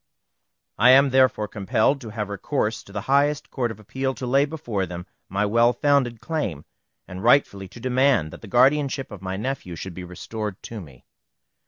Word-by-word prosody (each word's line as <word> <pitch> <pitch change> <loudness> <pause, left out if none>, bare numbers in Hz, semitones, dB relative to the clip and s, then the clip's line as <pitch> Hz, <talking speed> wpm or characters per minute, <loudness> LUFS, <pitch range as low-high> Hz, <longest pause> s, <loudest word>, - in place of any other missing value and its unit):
I 120 +4 +6
am 135 +1 +6
therefore 130 -5 +3
compelled 110 +7 0
to 115 - -8
have 105 -1 -4
recourse 110 +2 -2
to - - -14
the 105 0 -4
highest 145 +4 +1
Court 125 -3 -1
of 110 -2 -8
Appeal 130 +5 -3
to 130 - -6
lay 135 +3 +3
before 120 - -3
them 90 +1 -7 0.2
my 100 +2 0
well 115 +3 +3
founded 135 -6 +1
claim, 115 - -3 0.4
and 90 +1 -8
rightfully 115 -6 +3
to 120 - -13
demand 125 - +2
that - - -11
the 110 - -10
guardianship 135 +3 +2
of 105 -3 -9
my 95 0 -4
nephew 110 -6 -4
should 90 +3 -7
be 90 - -8
restored 95 +3 -6
to 115 -3 -7
me. 70 -7 -15
115 Hz, 185 wpm, -24 LUFS, 100-135 Hz, 0.4 s, I